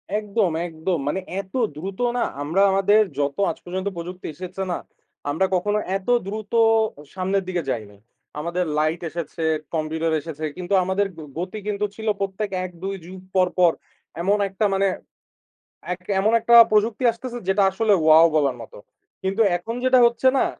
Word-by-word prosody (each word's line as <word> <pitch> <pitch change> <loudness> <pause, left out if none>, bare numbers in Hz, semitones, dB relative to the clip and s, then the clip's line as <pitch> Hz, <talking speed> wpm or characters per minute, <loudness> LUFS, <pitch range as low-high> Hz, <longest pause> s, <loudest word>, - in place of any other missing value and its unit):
একদম, 210 -3 0 0.2
একদম। 165 +1 -2
মানে 165 +6 0 0.2
এত 190 -1 -23 0.2
দ্রুত 190 +5 -6 0.2
না 240 - +2 0.2
আমরা 160 +7 +1
আমাদের 200 +2 +4 0.2
যত 140 -1 -1
আজ 165 - -4
পর্যন্ত 185 +2 -3
প্রযুক্তি 180 +2 -6
এসেছে 185 +3 -5
না, 175 - -1 0.5
আমরা 160 +7 +1
কখনো 205 +4 +1 0.2
এত 195 - -16 0.2
দ্রুত 210 +1 -6 0.6
সামনের 190 +1 0
দিকে 180 -2 -1
যাই 115 -4 -2
নাই। 100 - -20 0.4
আমাদের 170 +3 -1
light 155 +2 0
এসেছে, 165 0 -5 0.3
Computer 160 +1 -1
এসেছে, 155 0 -6
কিন্তু 180 +2 -3
আমাদের 190 +2 +1
গ - - -9 0.2
গতি 185 +4 -4
কিন্তু 210 0 0
ছিল 220 0 -7
প্রত্যেক 195 +1 -2 0.2
১ 180 - -7
২ 195 +1 -2
যুগ 185 +2 -9 0.2
পর, 185 -1 +4
পর 175 -2 +6 0.5
এমন 200 +4 +2
একটা 195 +3 -1
মানে 195 0 +2 1.1
এক 180 - -5 0.2
এমন 215 +3 +2
একটা 235 - +3 0.2
প্রযুক্তি 215 +3 +2
আসতেছে 240 +1 -7
যেটা 195 +1 +3
আসলে 215 +2 +1 0.2
wow 160 +1 +8
বলার 140 -4 +2
মতো। 115 - -12 0.4
কিন্তু 195 +3 -1 0.2
এখন 200 +7 -5
যেটা 255 0 +5
হচ্ছে 235 +2 +2
না - - +3
190 Hz, 165 wpm, -23 LUFS, 170-205 Hz, 1.1 s, wow